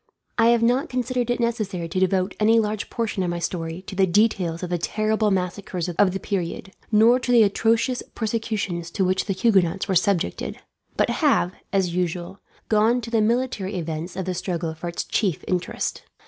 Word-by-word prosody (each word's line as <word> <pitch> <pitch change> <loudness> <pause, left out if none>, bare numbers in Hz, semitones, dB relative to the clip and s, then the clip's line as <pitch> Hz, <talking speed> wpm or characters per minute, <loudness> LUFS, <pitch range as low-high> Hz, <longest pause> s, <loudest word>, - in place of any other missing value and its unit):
I 225 - +6
have 235 -1 +4
not 255 +7 +2
considered 250 -1 -1
it 245 - 0
necessary 215 -7 -1
to 175 +3 -2
devote 190 0 +1
any 220 +2 +4
large 210 -1 -2
portion 225 -5 -2
of 180 - 0
my 175 - -2
story 165 +1 -4
to 195 - -8
details 185 -3 +1
of 180 - -4
the 175 - 0
terrible 215 +4 +1
massacres 180 -1 -2
of 185 +2 +3
the 195 - -3
period, 190 0 -4 0.2
nor 230 +4 +5
to 250 0 -2
the 235 -2 +7
atrocious 230 +4 +1
persecutions 215 -6 -2
to 190 +2 0
which 185 +1 +1
the 195 - -1
Huguenots 190 -3 +2
were 195 - 0
subjected; 190 -1 0 0.4
but - - +2
have, 280 - +2 0.2
as 190 -3 +1
usual, 180 +1 -2 0.3
gone 220 +3 +3
to 230 0 -7
the 225 -2 +3
military 220 -3 0
events 165 0 -4
of 190 -1 -3
the 185 - -2
struggle 175 -2 -3
for 160 +2 -7
its 170 - -3
chief 195 -8 -1
interest. 180 -1 -2
195 Hz, 185 wpm, -23 LUFS, 180-225 Hz, 0.4 s, the